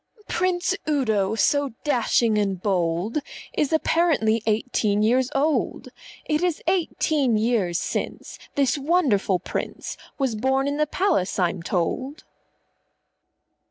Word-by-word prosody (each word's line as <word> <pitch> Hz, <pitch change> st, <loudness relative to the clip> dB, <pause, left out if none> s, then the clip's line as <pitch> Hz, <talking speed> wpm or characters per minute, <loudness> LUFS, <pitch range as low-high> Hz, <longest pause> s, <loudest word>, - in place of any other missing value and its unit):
"Prince 365 Hz, 0 st, 0 dB, 0.2 s
Udo, 220 Hz, -8 st, +1 dB
so 285 Hz, +3 st, +1 dB
dashing 235 Hz, -5 st, +2 dB
and 195 Hz, -3 st, -1 dB
bold, 180 Hz, -, 0 dB, 0.3 s
Is 295 Hz, -, 0 dB
apparently 315 Hz, -9 st, +2 dB
eighteen 215 Hz, -1 st, +1 dB
years 250 Hz, +3 st, +2 dB
old. 295 Hz, +3 st, 0 dB, 0.4 s
It 300 Hz, +1 st, 0 dB
is 355 Hz, -3 st, 0 dB
eighteen 315 Hz, -, +1 dB
years 210 Hz, -6 st, +1 dB
since -, -, -4 dB, 0.2 s
This 280 Hz, 0 st, +2 dB
wonderful 270 Hz, -, +2 dB
Prince 180 Hz, -, -5 dB, 0.2 s
_Was 240 Hz, -6 st, -1 dB
born 265 Hz, +1 st, +2 dB
in 285 Hz, +1 st, -1 dB
the 305 Hz, 0 st, +1 dB
Palace, 290 Hz, -, 0 dB
I'm 180 Hz, -1 st, 0 dB
told. 225 Hz, -, -2 dB
255 Hz, 115 wpm, -24 LUFS, 210-300 Hz, 0.4 s, dashing